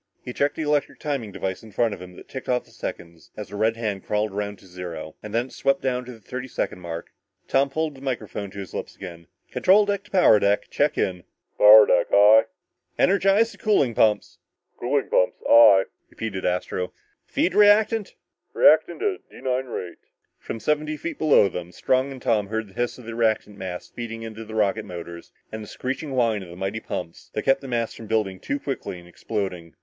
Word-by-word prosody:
He 125 - -5
checked 140 +3 0
the 160 - -3
electric 150 -1 0
timing 140 -8 -3
device 95 -1 -4
in 110 - -13
front 115 -3 +1
of - - -9
him 90 0 -11
that - - -13
ticked 130 - -8
off 125 -1 +1
the - - -23
seconds, 85 -1 -8
as 105 - -7
a - - -7
red 110 +2 +1
hand 105 -4 -3
crawled 105 0 -1
around 100 0 -4
to 95 - -19
zero, 90 -4 -8
and 105 - -8
when 115 +3 0
it 130 - -15
swept 135 0 +1
down 125 -1 -1
to 125 - -8
the 115 - -12
thirty 125 +5 -6
second 105 - -3
mark, 85 -2 -7 0.4
Tom 135 +1 +2
pulled 155 +2 -2
the 135 - -14
microphone 110 -6 -4
to 100 - -13
his 95 -2 -7
lips - - -6
again. 85 -4 -10 0.2
"Control 205 +3 +4
deck 200 -1 -1
to - - -18
power 180 - +5
deck. 100 +1 +1
Check 145 0 +1
in!" 90 -2 -1 0.4
"Power 105 +1 +10
deck, 90 -1 +3
aye?" 105 +2 +7 0.5
"Energize 195 +4 +3
the - - -16
cooling 200 - +2
pumps!" 110 -1 +1 0.4
"Cooling 135 +3 0
pumps, 90 - +2
aye!" 100 -4 +8 0.3
repeated 100 -4 -5
Astro. 90 0 -2 0.3
"Feed 180 - 0
reactant!" 210 +1 +4 0.4
"Reactant - - +4
at 405 -3 -2
D - - -14
9 130 0 -1
rate." 90 -7 -6 0.4
From 115 - -6
seventy 150 +3 -1
feet 170 - -6
below 150 -9 +5
them, 90 -2 -6
Strong 130 +7 0
and 135 - -8
Tom 105 -3 +1
heard 110 0 -3
the - - -18
hiss 120 +4 -2
of 125 - -13
the 115 - -6
reactant 110 -2 0
mass 95 -2 -6
feeding 115 -1 -7
into 110 0 -7
the 110 0 -9
rocket 110 0 +1
motors, 85 -1 -9 0.2
and 110 - -6
the 105 - -9
screeching 135 +5 -4
whine 115 -5 +1
of 90 - -10
the 85 - -10
mighty 95 +4 -3
pumps 85 -6 -7
that - - -1
kept 135 0 +3
the 135 - -8
mass 115 -2 -1
from 110 - -10
building 105 -4 -1
too 140 +9 -3
rapidly 135 -9 -4
and 85 0 -14
exploding. 90 - -5
110 Hz, 210 wpm, -24 LUFS, 95-135 Hz, 0.5 s, Power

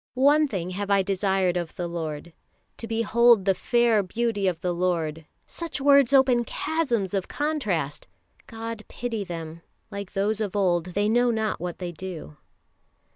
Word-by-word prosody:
"One 290 +4 +4
thing 185 -7 -4
have 200 +2 -4
I 200 -1 +4
desired 190 -2 +1
of 170 -2 -4
the 175 - -3
Lord... 165 -1 -5 0.4
to 230 - -7
behold 230 -1 +4
the 195 - +4
fair 235 +1 +2
beauty 205 0 -1
of 175 -3 -1
the 180 -1 -1
Lord" 165 -3 -1 0.2
such 335 -3 -5
words 280 -2 +5
open 260 -3 +4
chasms 240 - -1
of 195 -2 -1
contrast. 215 - -2 0.4
God 225 -1 -6
pity 230 -4 -4
them; 165 -3 -7 0.3
like 200 -1 -7
those 210 +2 0
of 210 -2 -3
old, 180 -4 +1
they 205 +1 +2
know 240 +3 +3
not 220 -2 -1
what 175 -1 -4
they 180 -2 -5
do. 170 - -8
200 Hz, 160 wpm, -25 LUFS, 180-235 Hz, 0.4 s, words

